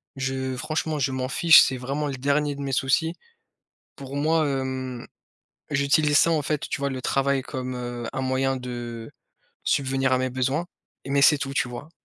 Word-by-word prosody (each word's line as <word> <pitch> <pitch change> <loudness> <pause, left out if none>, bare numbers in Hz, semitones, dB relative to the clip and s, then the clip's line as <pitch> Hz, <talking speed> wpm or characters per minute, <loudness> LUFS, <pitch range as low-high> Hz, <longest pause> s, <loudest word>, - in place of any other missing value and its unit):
Je 130 -1 -2
franchement, 155 +2 -2
je 135 0 0
m'en 130 0 -3
fiche, 165 +3 +7
c'est 130 - +1
vraiment 140 +4 -3
le 140 - -3
dernier 145 +2 0
de 140 - -7
mes 140 - -3
soucis, 135 +5 +1 0.8
pour 140 -1 -8
moi, 155 +1 +2
hem 130 -2 -3 0.7
j'utilise 145 +1 +3
ça, 165 - +4
en 155 -2 +2
fait, 150 +1 -2
tu 145 - -3
vois, 140 - 0
le 130 -1 -4
travail 135 +1 +1
comme, 130 -1 -5
heu, 120 -1 -5
un 130 - -3
moyen 130 0 0
de 120 -2 -6 0.5
subvenir 135 -1 +1
à 130 - +3
mes 130 - 0
besoins, 135 +7 -1 0.4
mais 140 0 +1
c'est 150 0 +6
tout, 135 0 -4
tu 125 - +1
vois? 125 +6 -8
135 Hz, 185 wpm, -25 LUFS, 130-145 Hz, 0.8 s, fiche